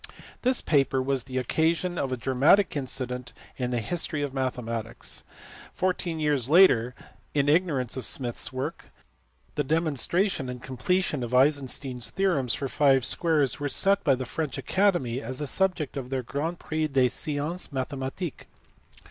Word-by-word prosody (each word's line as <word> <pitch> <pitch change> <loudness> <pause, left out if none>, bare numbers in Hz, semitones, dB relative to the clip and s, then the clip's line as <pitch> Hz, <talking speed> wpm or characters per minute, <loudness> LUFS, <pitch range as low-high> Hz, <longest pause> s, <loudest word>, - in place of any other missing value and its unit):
This 255 0 +2
paper 135 -3 +2
was 130 -1 -1
the 130 -1 -5
occasion 165 +7 0
of 135 - -2
a 130 - -1
dramatic 135 - +3
incident 125 -2 -3 0.2
in 125 -1 -2
the 120 -1 0
history 155 +3 0
of 140 -2 -3
mathematics. 120 -4 -3 0.5
Fourteen 180 -3 -1
years 145 -5 +1
later, 125 -9 +5 0.4
in 145 -1 +2
ignorance 145 -6 +1
of 130 - -4
Smith 120 -3 -2
s 115 - -3
work, 135 +5 -4 0.7
the 145 - 0
demonstration 160 - 0
and 125 0 -6
completion 145 +5 -1
of 120 +1 -2
Eisenstein 135 -1 +2
s 120 - -1
theorems 160 - 0
for 140 - -3
five 135 -2 +3
squares 155 -7 +2
were 145 0 -2
set 200 +7 +4
by 140 -4 +4
the 130 0 -5
French 150 +1 -3
Academy 175 - +1
as 130 -2 -5
the 150 - -2
subject 175 -1 0
of 130 -3 -5
their 130 -1 -2
"Grand 155 +8 -3
prix 155 -1 -2
des 135 -3 +3
sciences 150 +7 -2
mathematiques." 135 +4 -4
140 Hz, 155 wpm, -27 LUFS, 130-160 Hz, 0.7 s, later